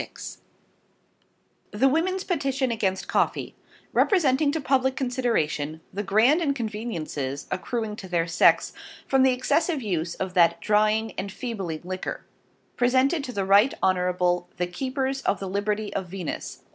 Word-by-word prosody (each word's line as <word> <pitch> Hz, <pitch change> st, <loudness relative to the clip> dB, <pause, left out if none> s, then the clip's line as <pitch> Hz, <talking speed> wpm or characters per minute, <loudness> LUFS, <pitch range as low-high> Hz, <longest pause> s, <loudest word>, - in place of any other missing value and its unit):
<<Cover>> -, -, -41 dB
THE 225 Hz, +6 st, +3 dB
WOMEN'S 360 Hz, +7 st, +1 dB
PETITION 270 Hz, -8 st, -1 dB
AGAINST 195 Hz, -4 st, -1 dB
COFFEE -, -, 0 dB, 0.4 s
REPRESENTING 295 Hz, -6 st, +3 dB
TO 320 Hz, -, -2 dB
PUBLICK 265 Hz, -1 st, +1 dB
CONSIDERATION 225 Hz, -, -1 dB
THE 200 Hz, -, -2 dB
Grand 220 Hz, -, +3 dB
INCONVENIENCIES 210 Hz, -, -3 dB
accruing 220 Hz, +2 st, -3 dB
to 190 Hz, -, -8 dB
their 170 Hz, -2 st, 0 dB
SEX 165 Hz, -1 st, +3 dB, 0.3 s
from 270 Hz, 0 st, +3 dB
the 260 Hz, 0 st, +5 dB
Excessive 305 Hz, +3 st, 0 dB
Use 175 Hz, -5 st, -2 dB
of 190 Hz, -1 st, -4 dB
that 170 Hz, -2 st, +4 dB
Drying, 215 Hz, +2 st, +2 dB
Enfeebling 195 Hz, -4 st, -4 dB
LIQUOR. 185 Hz, +1 st, -5 dB, 0.5 s
Presented 260 Hz, +5 st, +2 dB
to 250 Hz, -, -5 dB
the 200 Hz, -5 st, -2 dB
Right 200 Hz, +7 st, +5 dB
Honorable 180 Hz, -1 st, +1 dB
the 180 Hz, -, 0 dB
Keepers 265 Hz, +8 st, -2 dB
of 200 Hz, -, 0 dB
the 195 Hz, -, -4 dB
Liberty 205 Hz, +2 st, -2 dB
of 190 Hz, -2 st, -3 dB
VENUS. 180 Hz, -3 st, -6 dB
215 Hz, 135 wpm, -25 LUFS, 185-265 Hz, 0.5 s, the